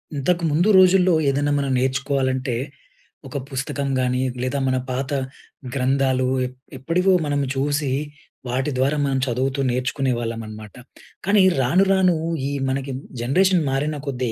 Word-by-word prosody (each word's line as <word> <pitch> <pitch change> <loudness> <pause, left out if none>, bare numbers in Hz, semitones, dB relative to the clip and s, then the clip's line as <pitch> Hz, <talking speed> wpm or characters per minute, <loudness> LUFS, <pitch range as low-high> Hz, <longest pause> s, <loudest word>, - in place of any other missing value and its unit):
ఇంతకు 170 +5 0
ముందు 170 +7 +2
రోజుల్లో 185 -1 +5 0.2
ఏదైనా 145 +1 0
మనం 140 -1 -1
నేర్చుకోవాలంటే, 130 -1 0 0.7
ఒక 130 - -5
పుస్తకం 140 +1 -3
గానీ, 125 0 0 0.2
లేదా 130 +2 -1
మన 130 0 +1
పాత 130 +2 -3 0.6
గ్రంథాలు 130 -1 +1 0.2
ఎప్ 125 0 -8 0.2
ఎప్పటివో 175 +8 +1
మనం 145 -1 0 0.2
చూసి, 145 0 0 0.6
వాటి 130 +4 -1
ద్వారా 135 +4 +1
మనం 135 -1 0
చదువుతూ 130 +2 -1
నేర్చుకునే 130 +2 -1
వాళ్ళం 115 -1 -4
అనమాట. 110 -1 -10 0.5
కానీ 200 +1 +4 0.2
రాను, 170 +10 +3
రాను 185 -2 +4 0.3
ఈ - - -3 0.2
మనకి 135 +1 -2 0.3
జనరేషన్ 180 +8 +3
మారిన 145 +3 -1
కొద్దీ 125 -3 -2
135 Hz, 135 wpm, -22 LUFS, 130-150 Hz, 0.7 s, రోజుల్లో